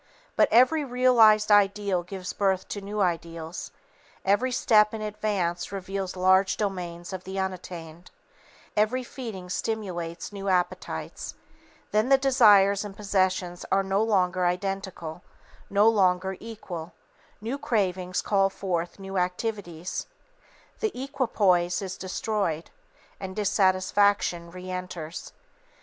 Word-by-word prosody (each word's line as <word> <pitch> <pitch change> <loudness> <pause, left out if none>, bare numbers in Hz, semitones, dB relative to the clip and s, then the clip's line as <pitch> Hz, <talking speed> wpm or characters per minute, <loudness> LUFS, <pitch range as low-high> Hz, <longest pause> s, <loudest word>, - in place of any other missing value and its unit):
But - - +5
every 255 +6 +5
realized 240 -5 +5
ideal 200 -2 +3
gives 185 +1 -6
birth 190 -2 0
to 205 - -4
new 205 +1 -3
ideals, 170 -2 -3 0.6
every 205 +7 +2
step 215 -3 +4
in 220 - -5
advance 205 -5 -2
reveals 195 -1 -4
large 190 +1 +3
domains 180 -3 -4
of 185 -1 -5
the 190 +1 -6
unattained; 180 -3 -5 0.7
every 215 +5 +1
feeding 225 -8 -7
stimulates 180 -4 -4
new 200 -1 -4
appetites, 180 -1 -2 0.6
then 215 +4 +2
the 270 - +7
desires 210 -7 +5
and 205 -2 -8
possessions 185 -3 0
are 195 0 +3
no 195 +1 +1
longer 185 -4 +2
identical, 180 -3 -3 0.5
no 205 +2 +4
longer 190 -3 +3
equal; 180 -7 -8 0.5
new 235 +7 -4
cravings 185 -6 -1
call 195 -1 +3
forth 175 -3 -3
new 195 -1 -3
activities, 180 -2 -3 0.7
the 430 - -2
equipoise 210 -10 +1
is 190 -2 -5
destroyed, 185 -3 -2 0.5
and 190 -1 -6
dissatisfaction 190 -3 +2
reenters. 180 -2 -6
195 Hz, 115 wpm, -26 LUFS, 180-210 Hz, 0.7 s, the